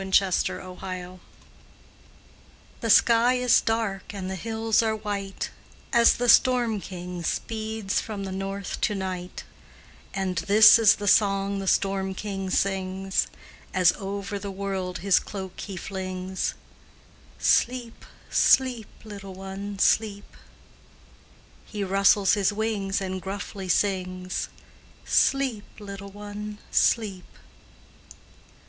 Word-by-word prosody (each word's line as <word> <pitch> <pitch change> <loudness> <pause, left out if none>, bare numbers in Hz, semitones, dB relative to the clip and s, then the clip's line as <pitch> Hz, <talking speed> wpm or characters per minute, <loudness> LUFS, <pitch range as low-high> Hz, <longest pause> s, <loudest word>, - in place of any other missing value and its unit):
NORSE 190 -1 +2
LULLABY 185 0 -7 1.6
The 230 - -3
sky 235 +3 +5
is 250 -1 +4
dark 215 -3 -2
and 190 -1 -4
the - - -3
hills 225 +3 0
are 220 -1 0
white 200 -2 -4 0.4
As 235 -1 +6
the 245 - -1
storm 240 -3 +4
king 180 -1 -7
speeds 220 +2 -2
from 205 -3 -6
the 190 - -5
north 195 +1 -4
to 210 - +1
night, 185 -2 -5 0.7
And 190 -2 -2
this 215 +3 +7
is 220 -2 +6
the 205 - -5
song 195 -1 +3
the 195 - -5
storm 190 0 +1
king 195 -2 -4
sings, 190 0 0 0.5
As 180 -2 +5
over 200 0 -4
the 200 0 -6
world 190 -2 -4
his 195 - +5
cloak 190 -2 -8
he 195 -2 -6
flings: 185 0 -4 0.8
"Sleep, 240 -1 +1 0.3
sleep, 250 -5 +3 0.2
little 200 -3 -9
one, 195 +1 -6
sleep;" 205 0 +1 1.3
He 210 -2 -5
rustles 195 +1 +4
his 205 -2 +2
wings 205 -2 -1
and 190 -1 -4
gruffly 195 0 -6
sings: 185 -1 -1 0.6
"Sleep, 265 -6 +1
little 200 -1 -8
one, 205 +1 -7
sleep." 200 -5 +1
195 Hz, 115 wpm, -25 LUFS, 190-215 Hz, 1.6 s, this